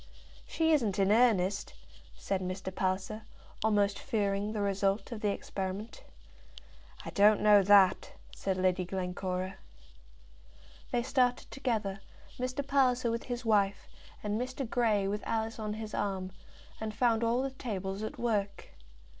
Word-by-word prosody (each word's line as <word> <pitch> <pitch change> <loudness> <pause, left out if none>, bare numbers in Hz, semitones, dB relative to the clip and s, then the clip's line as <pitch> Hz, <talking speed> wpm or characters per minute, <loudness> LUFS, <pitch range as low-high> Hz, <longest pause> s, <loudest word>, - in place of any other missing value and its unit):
"She 320 0 +1
isn't 230 -10 +2
in 195 0 +3
earnest," 205 -4 +2 0.4
said 195 -1 -2
Mr. 185 +1 -4
Palliser, 190 +3 -2 0.4
almost 205 -2 +2
fearing 205 -4 -1
the 215 - -3
result 200 +2 0
of 225 -3 -5
the 210 - +1
experiment. 195 +2 -5 1.0
"I - - -5
don't 210 +1 +5
know 210 -1 +6
that," 195 -1 +5 0.2
said 190 -1 -2
Lady 185 0 +1
Glencora. 185 0 -3 1.3
They 240 -1 0
started 250 -1 +1
together, 220 -8 -2 0.4
Mr. 255 +2 -2
Palliser 255 -4 +2
with 230 0 -3
his 245 -1 -4
wife, 205 -3 +2 0.4
and 210 +2 -1
Mr. 255 +1 -4
Grey 220 -4 +1
with 205 +1 -2
Alice 225 0 -2
on 210 -1 -3
his 215 -1 -7
arm, 190 -2 -2 0.5
and 215 -1 -4
found 235 -1 +2
all 235 +3 +2
the 270 - -2
tables 200 -6 -4
at 220 - -5
work. 205 -4 -2
210 Hz, 140 wpm, -31 LUFS, 195-235 Hz, 1.3 s, know